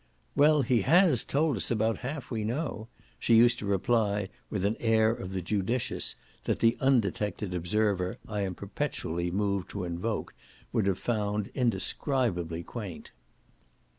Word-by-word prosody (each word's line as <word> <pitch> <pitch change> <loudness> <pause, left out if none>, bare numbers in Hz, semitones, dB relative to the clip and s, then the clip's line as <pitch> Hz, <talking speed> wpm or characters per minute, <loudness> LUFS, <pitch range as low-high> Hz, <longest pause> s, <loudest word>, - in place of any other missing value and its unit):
"Well, 150 0 +5
he 120 -2 +2
HAS 165 - +4
told 145 -3 +1
us - - -3
about 110 -1 +1
half 135 +1 -5
we 110 -3 -1
know," 115 -1 -3 0.3
she 115 - +3
used 120 +1 +5
to 105 - -4
reply 100 -1 +1 0.2
with 100 -2 -1
an 105 +2 +1
air 110 -1 +3
of 95 -5 -5
the 95 -2 -3
judicious 105 +6 -2 0.3
that - - +1
the 115 +1 +3
undetected 105 -6 +1
observer 90 +1 0
I 105 -1 -3
am 95 -2 -2
perpetually 85 +1 -3
moved 100 0 -1
to 100 - -4
invoke 90 +6 -3 0.4
would - - +2
have 95 -2 +1
found 105 -3 -1
indescribably 105 - 0
quaint. 100 -4 -7
105 Hz, 145 wpm, -29 LUFS, 95-120 Hz, 0.4 s, Well